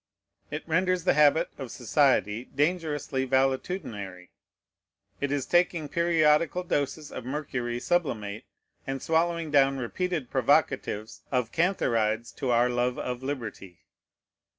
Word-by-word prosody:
It 150 +3 -6
renders 185 +2 +1
the 185 - +3
habit 150 +1 +4
of 135 -3 -5
society 120 -3 +1
dangerously 145 -3 -1
valetudinary; 130 - -1 0.9
it 140 -1 -1
is 140 -2 -1
taking 175 -3 +2
periodical 170 +1 +2
doses 145 -2 -2
of - - -6
mercury 125 -3 -3
sublimate, 115 - -1 0.4
and 135 0 -2
swallowing 165 +1 0
down 135 -2 +4
repeated 155 +2 -3
provocatives 105 -1 +1
of 125 -3 0
cantharides 115 - +1
to 130 - -2
our 120 0 +4
love 125 0 0
of 125 0 -4
liberty. 115 -10 -6
135 Hz, 115 wpm, -27 LUFS, 120-160 Hz, 0.9 s, habit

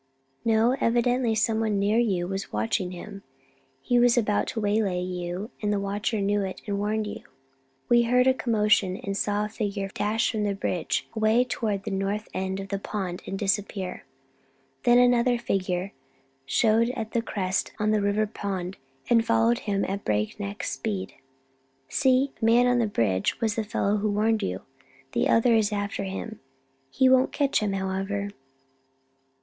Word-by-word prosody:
"No, 225 +3 +3
evidently 240 0 +2
someone 220 -1 +1
near 205 +3 +2
you 190 -7 +1
was 195 +1 -4
watching 110 - -1
him; 195 +3 -9 0.6
he 245 -1 +3
was 245 0 +4
about 210 -3 +1
to 225 - -3
waylay 205 -3 +1
you, 180 +3 -4
and 210 -1 0
the 205 - +1
watcher 205 +3 -2
knew 205 +1 +1
it 190 -1 -4
and 200 -1 -2
warned 215 +1 -1
you." 210 - -6 0.7
We 240 0 +5
heard 250 +2 +3
a 260 - +5
commotion 210 -6 +2
and 200 -4 -4
saw 205 +1 0
a - - -5
figure 205 -3 -3
dash 220 +2 0
from 215 -2 -2
the 200 -1 0
bridge, 180 -4 -2
away 220 +2 +3
toward 215 -5 -2
the 215 - -4
north 195 +2 -2
end 190 0 -2
of 195 0 -7
the 200 - -2
pond, 190 -4 -4
and 195 - -3
disappear. 195 -2 -2 0.8
Then 240 0 +6
another 245 0 +4
figure 190 -4 -2 0.5
showed 225 - +3
at 220 -3 -4
the 235 - +1
crest 190 -4 -2
on 215 0 +1
the 215 -1 +2
River 205 +2 +1 0.2
Road 190 -2 -3 0.3
and 230 -1 +4
followed 230 +1 +2
him 200 -2 -1
at 200 +1 -4
breakneck 200 - -2
speed. 200 -4 -3 0.8
"See 265 -1 +2
the - - 0
man 240 +2 +5
on 245 0 +3
the 230 - +2
bridge 100 - 0
was 225 -3 +1
the 225 - -1
fellow 210 -1 0
who 210 +1 0
warned 215 +2 +1
you. 90 +1 -3 0.5
The - - +1
other 230 +1 +4
is 220 -2 +3
after 205 -1 -2
him. 200 +3 -6 0.5
He 260 - +3
won't 260 0 +4
catch 285 -2 +1
him, 210 -2 -1
however." 195 +1 -2
210 Hz, 170 wpm, -26 LUFS, 195-230 Hz, 0.8 s, Then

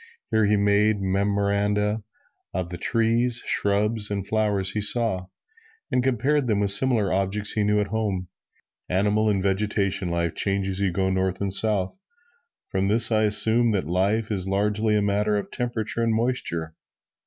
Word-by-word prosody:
Here 110 -1 +3
he 105 0 +2
made 100 +1 +2
memoranda 100 +2 0 0.5
of 90 -1 -3
the 90 - -6
trees, 115 +1 +1
shrubs 105 +1 0
and 100 -1 -4
flowers 105 -3 0
he 105 - -2
saw, 105 -4 +1 0.6
and 125 - +1
compared 130 +2 +1
them 105 -3 +1
with 100 -1 +2
similar 110 -3 +3
objects 100 +2 0
he 105 - 0
knew 105 0 +2
at 105 - -2
home. 100 -5 -2 0.6
"Animal 105 +4 +1
and 100 -2 0
vegetable 100 -2 -1
life 85 -1 -1
change 100 -1 0
as 95 0 -3
you 100 -2 0
go 95 +1 -1
North 95 0 -1
and 100 -1 -2
South; 100 - +2 0.7
from 95 0 -1
this 115 +3 +5
I 110 -1 +3
assume 110 +2 +3
that 95 - -1
life 100 +7 0
is 95 -3 -2
largely 105 +2 0
a 105 - +1
matter 105 +1 0
of 100 - -5
temperature 120 -2 -3
and 115 -1 +1
moisture." 110 -9 -2
105 Hz, 165 wpm, -24 LUFS, 95-110 Hz, 0.7 s, this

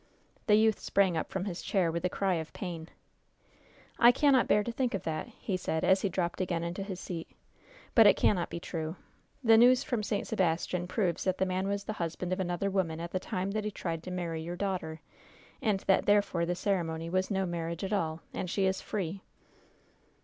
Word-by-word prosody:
The 210 - +6
youth 220 0 +3
sprang 195 -3 +2
up 160 - -2
from 190 0 -3
his 185 -4 -4
chair 180 -5 +1
with 170 0 -3
a 180 - +2
cry 195 +1 0
of 160 -2 -3
pain. 170 -4 -6 1.1
"I 240 0 +8
cannot 270 -1 +4
bear 210 - +4
to 235 - -3
think 245 -2 -1
of 195 - -4
that!" 155 +4 -3
he 220 -4 -4
said, 160 -3 -2
as 190 0 +4
he 200 - +1
dropped 175 0 -2
again 170 -2 -1
into 170 +3 -4
his 195 -2 -5
seat. 170 -3 -6 0.6
"But 225 -3 +8
it - - +7
cannot 180 -4 +2
be 170 - -5
true! 160 -1 -4 0.5
The 225 -1 +7
news 250 +2 +6
from 240 -4 -1
St. 205 -1 -2
Sebastian 180 -2 0
proves 180 -2 0
that 185 -1 +1
the 190 - +1
man 185 +1 -1
was 200 0 -1
the 215 - -4
husband 170 +2 -2
of 185 - -3
another 185 +2 -1
woman 170 -4 0
at 170 +1 -5
the 185 - -1
time 185 +1 -3
that 215 +1 -2
he 210 - -1
tried 165 -5 -4
to 185 - -8
marry 170 -3 -3
your 170 +2 -5
daughter 175 -5 -3 0.6
and 205 -4 +1
that 195 - +2
therefore 200 -5 +3
the 175 - 0
ceremony 165 -4 -1
was 185 +2 0
no 195 -2 0
marriage 170 -1 -3
at 195 - -2
all, 165 -5 -1
and 180 - -3
she 195 +2 +1
is 190 0 0
free." 195 -2 -3
185 Hz, 215 wpm, -30 LUFS, 170-200 Hz, 1.1 s, I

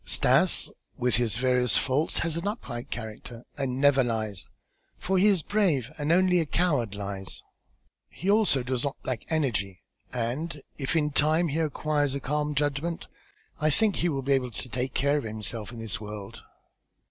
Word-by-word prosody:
Stas - - +4 0.3
with 125 -2 +3
his 115 -2 +1
various 125 -2 +2
faults 140 +4 +1
has 165 -2 0
an 170 +4 -2
upright 135 - -5
character 115 +1 -7
and 135 -2 -2
never 140 -1 +5
lies, 110 -4 -3 0.5
for 190 0 0
he 200 - +5
is 190 -7 +3
brave, 165 - +1
and 150 +2 0
only 180 0 +4
a 160 - 0
coward 140 - +1
lies. 100 -2 -5 0.7
He 185 - -7
also 200 - +4
does 125 0 -2
not 140 -1 -2
lack 125 -4 -2
energy 105 - -1 0.3
and 130 +6 -3 0.2
if 135 +2 -1
in 150 -2 +2
time 155 +4 +2
he 150 +3 -1
acquires 150 -2 0
a - - -2
calm 150 +2 -1
judgment, 145 +4 -1 0.5
I 155 - +2
think 205 +6 +3
he 175 - +1
will 135 -3 -2
be 140 +1 +2
able 130 -2 +1
to 110 +2 -6
take 125 +2 -3
care 140 +2 +3
of - - -6
himself 110 0 -5
in 120 - -9
this 115 -3 -3
world." 105 -2 -8
135 Hz, 175 wpm, -27 LUFS, 120-155 Hz, 0.7 s, never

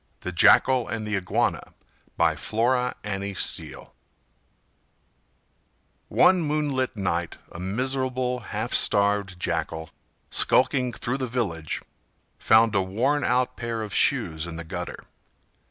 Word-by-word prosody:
THE 90 - -4
JACKAL 125 +7 +4
AND 110 -1 -4
THE 105 0 -2
IGUANA 95 -1 0 0.6
By - - +3
Flora 125 +3 0
Annie 100 -1 -4
Steel - - -1 2.1
One 185 -1 +4
moonlight 145 -6 -1
night 85 -3 -2
a 85 - -9
miserable, 125 +5 -1
half 105 - -5
starved 100 -2 +2
Jackal, 80 -2 -3 0.4
skulking 125 -3 +3
through 125 +3 -4
the 130 - -2
village, 100 - -3 0.6
found 110 0 +4
a 100 - +2
worn 125 +10 0
out 125 0 +1
pair 115 -2 -4
of 105 -2 -7
shoes 80 +1 +1
in 85 - -7
the 85 - -6
gutter. 80 - -6
110 Hz, 120 wpm, -25 LUFS, 95-130 Hz, 2.1 s, JACKAL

